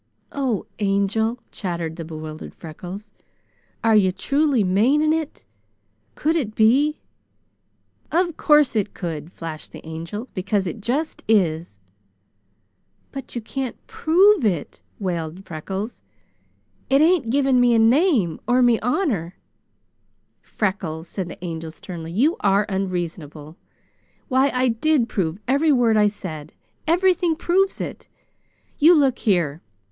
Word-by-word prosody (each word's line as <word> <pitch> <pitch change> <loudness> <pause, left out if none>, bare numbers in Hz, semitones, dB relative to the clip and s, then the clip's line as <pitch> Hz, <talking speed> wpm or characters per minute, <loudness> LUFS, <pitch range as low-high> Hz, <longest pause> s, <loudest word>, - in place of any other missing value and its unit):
"Oh, 260 -7 -1
Angel!" 205 +3 +1
chattered 170 -4 -4
the 165 - -6
bewildered 155 -1 -8
Freckles, 180 +6 -9 0.7
"are 225 -1 +4
you 190 -3 +4
truly 280 +2 +1
maning 260 +12 +3
it? 320 -2 -4 0.7
Could 315 +2 0
it 225 -10 -2
be?" 275 +8 +3 1.1
"Of 345 -1 +1
course 300 -6 +4
it 210 -2 -1
could," 165 -3 -5
flashed 160 -3 -8
the - - -11
Angel, 165 +9 -6
"because 195 +1 -1
it 195 +5 -5
just 280 +9 -2
is!" 170 - +1 1.3
"But 270 -2 -8
you 240 - -2
can't 260 +2 -4
prove 370 +2 +4
it," 180 -9 -1 0.2
wailed 175 -1 -4
Freckles. 190 +6 -5 0.9
"It 275 - +4
ain't 320 -7 +3
giving 265 -1 +3
me 240 -1 +4
a - - +4
name, 230 - +3
or 250 +1 +4
me 240 -2 +4
honor!" 220 - -1 1.1
"Freckles," 185 -6 -3
said 190 -3 -4
the 180 - -9
Angel 165 -1 -5
sternly, 165 +1 -8
"you 270 - +2
are 200 +1 +3
unreasonable! 170 -6 -4 0.7
Why, 265 +2 +3
I 255 -1 +1
did 240 +2 +2
prove 180 -6 -2
every 285 +4 +3
word 240 -5 +3
I 210 -1 +5
said! 160 -7 -6 0.3
Everything 350 0 +3
proves 380 +4 +1
it! - - -6 0.7
You 330 +4 +7
look 270 -3 +2
here! 170 -7 +1
215 Hz, 125 wpm, -22 LUFS, 175-275 Hz, 1.3 s, You